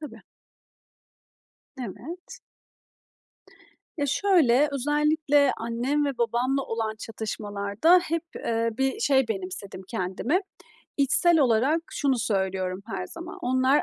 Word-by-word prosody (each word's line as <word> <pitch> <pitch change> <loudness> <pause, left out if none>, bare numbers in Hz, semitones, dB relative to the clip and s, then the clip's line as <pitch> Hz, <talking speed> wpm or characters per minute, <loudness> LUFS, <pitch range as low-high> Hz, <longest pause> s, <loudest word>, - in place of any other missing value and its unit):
Tabii. 300 - -9 1.6
Evet. 270 - -8 1.6
Ya, 290 -2 0
şöyle, 300 -5 +3
özellikle 295 0 +2
annem 240 +6 -1
ve 275 -4 -3
babamla 250 +3 +1
olan 225 -2 -3
çatışmalarda 215 - +1
hep, 330 0 -1 0.2
ııı, 230 0 +1
bir 270 +10 0
şey 265 - +3
benimsedim 190 -1 -5
kendime. 225 - -1 0.6
İçsel 315 +4 +4
olarak 265 +5 +3
şunu 270 -3 0
söylüyorum 190 -3 -1
her 185 -5 -4
zaman: 345 +3 -9
"Onlar 260 +3 +3
260 Hz, 100 wpm, -26 LUFS, 220-295 Hz, 1.6 s, İçsel